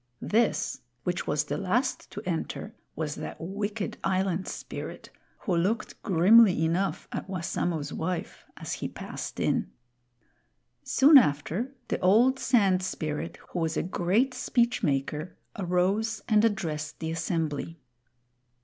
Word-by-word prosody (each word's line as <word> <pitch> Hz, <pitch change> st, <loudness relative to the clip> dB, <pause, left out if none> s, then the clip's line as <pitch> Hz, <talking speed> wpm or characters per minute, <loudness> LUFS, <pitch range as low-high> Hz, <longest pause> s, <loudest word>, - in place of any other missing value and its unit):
This, 225 Hz, +1 st, +1 dB, 0.2 s
which 180 Hz, 0 st, -2 dB
was 150 Hz, 0 st, +1 dB
the 150 Hz, -, -3 dB
last 225 Hz, +7 st, 0 dB
to -, -, -7 dB
enter, 180 Hz, +5 st, -3 dB, 0.2 s
was 155 Hz, -2 st, -2 dB
that -, -, -7 dB
wicked 205 Hz, +4 st, -4 dB
Island 190 Hz, -1 st, 0 dB
Spirit, -, -, -7 dB, 0.3 s
who 185 Hz, -, 0 dB
looked 205 Hz, +6 st, -1 dB
grimly 190 Hz, -2 st, +6 dB
enough 180 Hz, +4 st, -1 dB
at -, -, -5 dB
Wassamo's 170 Hz, -4 st, -2 dB
wife 175 Hz, +2 st, -4 dB
as -, -, -5 dB
he -, -, -3 dB
passed -, -, -7 dB
in. -, -, +1 dB, 1.1 s
Soon 280 Hz, +1 st, +7 dB
after, 190 Hz, -, -1 dB
the -, -, 0 dB
old 235 Hz, +8 st, +4 dB
Sand 200 Hz, -7 st, +3 dB
Spirit, 155 Hz, -3 st, -3 dB
who 180 Hz, -, -3 dB
was 160 Hz, -1 st, -1 dB
a -, -, +1 dB
great 190 Hz, +9 st, +1 dB
speech 240 Hz, -1 st, +1 dB
maker, 150 Hz, +1 st, -1 dB, 0.2 s
arose 195 Hz, +5 st, 0 dB
and 215 Hz, -2 st, +4 dB
addressed 160 Hz, -8 st, -1 dB
the 160 Hz, -1 st, -3 dB
assembly. 165 Hz, -1 st, -2 dB
185 Hz, 130 wpm, -28 LUFS, 165-215 Hz, 1.1 s, Soon